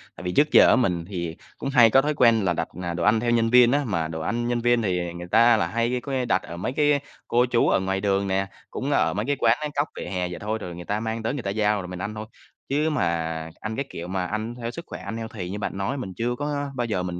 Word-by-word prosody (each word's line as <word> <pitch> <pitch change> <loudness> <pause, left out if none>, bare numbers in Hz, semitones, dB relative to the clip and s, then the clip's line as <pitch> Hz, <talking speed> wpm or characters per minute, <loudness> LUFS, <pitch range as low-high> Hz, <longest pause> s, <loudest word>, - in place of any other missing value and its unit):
Tại - - -10
vì 90 - -2
trước 150 +10 +3
giờ - - +8
á - - +6
mình 90 -10 0
thì 85 -4 -4 0.2
cũng - - -3
hay 120 -4 +6
có 135 +4 +5
thói 150 +2 0
quen 115 -6 +4
là 90 - +2
đặt, - - -2 0.2
ờ, 85 -1 -2
đồ 85 0 -3
ăn 110 +4 +4
theo 120 +1 0
nhân 115 -1 +2
viên 125 0 +6
á, 145 +2 +2
mà 85 -6 -1
đồ 80 0 -5
ăn 120 +8 -1
nhân 120 -1 0
viên 120 0 +3
thì 90 -4 -1
người 85 0 -7
ta 115 +4 +5
là 85 - 0
hay, 115 +6 0
có 140 - -6
nghĩa, 130 -2 0
đặt 120 - +2
ở 85 - -8
mấy 110 +8 -3
cái 145 -1 +3 0.3
cô 120 +1 +3
chú 120 -1 +2
ở - - +3
ngoài 95 +1 -1
đường 100 -1 +1
nè, 95 0 0 0.2
cũng - - -3
ở - - +2
mấy 105 +4 -2
cái 145 +2 +1
quán 115 +2 +4 0.2
cóc 145 +2 +1
vỉa - - -6
hè 90 -2 -2
vậy 90 - -7
thôi, 110 +2 -2
rồi 90 -1 -6
người 85 0 -8
ta 105 +1 -1
mang 110 0 -3
tới 115 - -1
người 140 -5 -4
ta 100 - -2
giao 105 0 +1
rồi 90 - -7
mình 90 0 -7
ăn 105 +3 -4
thôi. 110 0 -5 0.4
Chứ 150 +3 +1
mà 150 -8 0 0.6
ăn 110 0 -4
cái 140 - -2
kiểu 85 - -7
mà 95 0 -2
ăn 110 +4 -3
theo 120 -1 -5
sức 170 +6 -8
khỏe - - -7
ăn 105 +3 -5
healthy 110 -5 -6
như 105 - -4
bạn 100 - -4
nói 100 +8 -2
mình 95 -8 -5
chưa 120 +1 -1
có 145 0 -3
bao 120 -1 -1
giờ 105 -6 -1
mình 90 -1 -4
110 Hz, 300 wpm, -24 LUFS, 95-120 Hz, 0.6 s, giờ